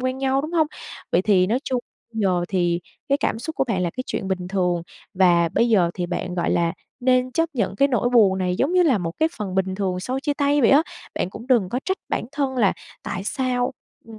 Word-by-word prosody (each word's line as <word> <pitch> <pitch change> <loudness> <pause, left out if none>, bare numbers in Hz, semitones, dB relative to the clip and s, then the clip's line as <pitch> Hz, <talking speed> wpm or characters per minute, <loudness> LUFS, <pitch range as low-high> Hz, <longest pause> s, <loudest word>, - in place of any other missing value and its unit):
quen 255 +1 -2
nhau, 270 0 +1
đúng 315 +3 -5
hông? 320 -3 +3 0.5
Vậy - - +3
thì 190 -3 +4
nói 230 +5 +1
chung 255 -2 -1 0.3
bây 225 - -3
giờ 180 -3 +1
thì 175 -2 +1 0.3
cái 280 +1 +2
cảm - - -1
xúc 315 +7 -6
của - - +2
bạn 195 -8 -1
là 175 - 0
cái 255 +6 -5
chuyện 190 - -3
bình 180 -1 -2
thường, 180 -3 0 0.3
và 175 -3 +4
bây 235 +8 +2
giờ 180 -6 +3
thì 175 -1 -2
bạn, 180 0 -3
gọi 175 - 0
là, 170 0 +1 0.3
nên 255 0 +2
chấp 330 +2 +1
nhận 200 -5 -1
cái 275 +6 +4
nỗi 245 -2 +1
buồn 205 -6 +5
này 180 -1 0
giống 290 +7 +1
như 365 - +5
là 270 - +3
một 165 -2 -3
cái 315 +1 +3
phần 195 -4 -4
bình 190 0 0
thường 185 -2 -2
sau 255 +7 -3
chia 290 +1 -1
tay 285 +1 +2
vậy 235 - +5
á. 280 +3 +6 0.3
Bạn 180 - -2
cũng 230 +5 -10
đừng 235 -8 +3
có 250 +6 -2
trách 380 0 -1
bản - - -1
thân 275 -3 -1
là 205 -6 +3 0.3
tại 185 +2 -4
sao, 250 0 -1 0.3
ừm, 225 -1 -12
225 Hz, 250 wpm, -23 LUFS, 185-265 Hz, 0.5 s, á